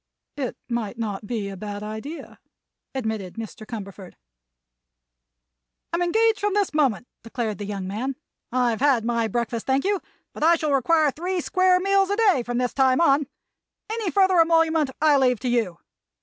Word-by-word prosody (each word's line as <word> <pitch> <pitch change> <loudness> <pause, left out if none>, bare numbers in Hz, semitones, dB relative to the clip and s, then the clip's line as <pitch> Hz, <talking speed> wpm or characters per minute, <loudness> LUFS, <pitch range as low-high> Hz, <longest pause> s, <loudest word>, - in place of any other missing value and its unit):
"It 270 -4 -4
might 235 -2 -3
not 210 -2 -4
be 220 -4 -3
a 195 - -7
bad 205 +1 -6
idea," 220 +10 -7 0.6
admitted 220 -7 -3
Mr. 225 0 -8
Cumberford. 200 -5 -8 1.8
"I'm 340 - 0
engaged 440 +5 +2
from 410 -1 0
this 405 -5 +1
moment," 260 -7 +1
declared 230 -2 -4
the 205 - -5
young 200 -2 -4
man. 245 +8 -3 0.4
"I've 245 -2 +1
had 260 -5 +3
my 235 -1 +1
breakfast, 230 +1 -3
thank 265 +3 +1
you, 400 -1 +1 0.3
but - - -10
I 335 +2 +6
shall 305 -3 -1
require 300 +3 +3
three 360 +5 -3
square 370 +1 +3
meals 390 0 +2
a 405 - +1
day 410 - +3
from 240 0 -3
this 250 -1 0
time 260 -1 +3
on. 285 -4 +3 0.6
Any 445 -4 -2
further 375 -1 +4
emolument 325 -2 +3
I 300 -1 +5
leave 250 -3 +2
to 250 - -1
you. 225 -8 0
260 Hz, 165 wpm, -24 LUFS, 225-335 Hz, 1.8 s, I